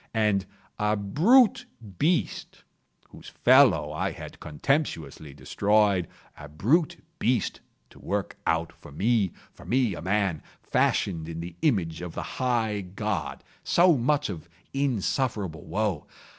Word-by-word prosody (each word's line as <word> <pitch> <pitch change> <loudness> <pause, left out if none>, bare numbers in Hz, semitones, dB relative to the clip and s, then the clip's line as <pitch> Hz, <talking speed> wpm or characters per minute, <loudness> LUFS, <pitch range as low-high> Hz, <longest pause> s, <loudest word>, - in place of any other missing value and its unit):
And 105 -3 +1 0.3
a 105 0 +2
brute 180 - +4 0.3
beast 170 +4 -1 0.5
—whose - - -12
fellow - - +4
I - - -2
had - - -10
contemptuously 80 - -2
destroyed—a 100 -6 0
brute 155 - +1 0.2
beast 120 -2 0 0.3
to - - -16
work 100 0 -3
out 80 0 0
for 80 -3 -15
me—for 100 +3 -1
me 125 -4 +1
a - - -7
man, 95 -3 0 0.2
fashioned 85 -4 0
in 80 0 -6
the 85 0 -7
image 85 - 0
of 90 -2 -7
the - - -6
High 115 -5 0
God—so 105 - 0
much 145 +4 +1
of 85 -2 -9 0.2
insufferable 115 - -1
woe! 95 -2 -2
105 Hz, 115 wpm, -26 LUFS, 85-125 Hz, 0.5 s, brute